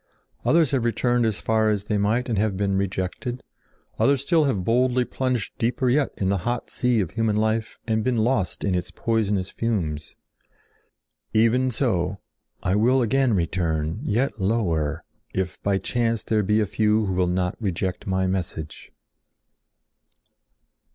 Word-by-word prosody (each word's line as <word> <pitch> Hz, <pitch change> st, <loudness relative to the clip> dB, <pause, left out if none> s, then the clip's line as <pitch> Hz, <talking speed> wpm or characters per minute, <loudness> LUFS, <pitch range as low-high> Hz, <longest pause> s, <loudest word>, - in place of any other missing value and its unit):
Others 165 Hz, -3 st, +4 dB
have 135 Hz, -4 st, +1 dB
returned 120 Hz, +1 st, +1 dB
as 105 Hz, -4 st, -2 dB
far 110 Hz, -1 st, +2 dB
as 105 Hz, -2 st, 0 dB
they 105 Hz, 0 st, -1 dB
might 110 Hz, +5 st, +1 dB
and 115 Hz, -, 0 dB
have 105 Hz, -2 st, 0 dB
been 100 Hz, -1 st, 0 dB
rejected. 100 Hz, +6 st, -3 dB, 0.6 s
Others 140 Hz, -1 st, +3 dB
still 160 Hz, 0 st, +3 dB
have 105 Hz, -10 st, 0 dB
boldly 125 Hz, +3 st, +2 dB
plunged 125 Hz, -5 st, -2 dB
deeper 125 Hz, +2 st, +1 dB
yet 140 Hz, +1 st, +2 dB
in 95 Hz, -, 0 dB
the 100 Hz, -1 st, +1 dB
hot 120 Hz, +6 st, -3 dB
sea 125 Hz, -3 st, +2 dB
of 85 Hz, -5 st, -3 dB
human 110 Hz, +1 st, 0 dB
life 110 Hz, +1 st, 0 dB
and 110 Hz, -1 st, +1 dB
have -, -, -2 dB
been 125 Hz, 0 st, +1 dB
lost 110 Hz, -4 st, 0 dB
in 100 Hz, -, +1 dB
its 90 Hz, -1 st, -2 dB
poisonous 105 Hz, -4 st, -1 dB
fumes. 80 Hz, -10 st, -2 dB, 1.2 s
Even 115 Hz, +4 st, +3 dB
so, 100 Hz, -7 st, 0 dB, 0.5 s
I 90 Hz, -, +1 dB
will 125 Hz, +5 st, +3 dB
again 125 Hz, 0 st, +2 dB
return, 85 Hz, -1 st, -1 dB
yet 120 Hz, -3 st, -1 dB
lower, 85 Hz, -8 st, 0 dB, 0.3 s
if 95 Hz, -1 st, -2 dB
by 100 Hz, -1 st, +1 dB
chance 115 Hz, +1 st, -1 dB
there 110 Hz, -1 st, +1 dB
be 105 Hz, +2 st, +2 dB
a 105 Hz, -, +2 dB
few 105 Hz, +2 st, +1 dB
who 95 Hz, -, -1 dB
will 90 Hz, 0 st, +1 dB
not 90 Hz, +1 st, 0 dB
reject 95 Hz, -2 st, -2 dB
my 95 Hz, 0 st, +1 dB
message." 85 Hz, -5 st, -4 dB
110 Hz, 160 wpm, -24 LUFS, 95-120 Hz, 1.2 s, Others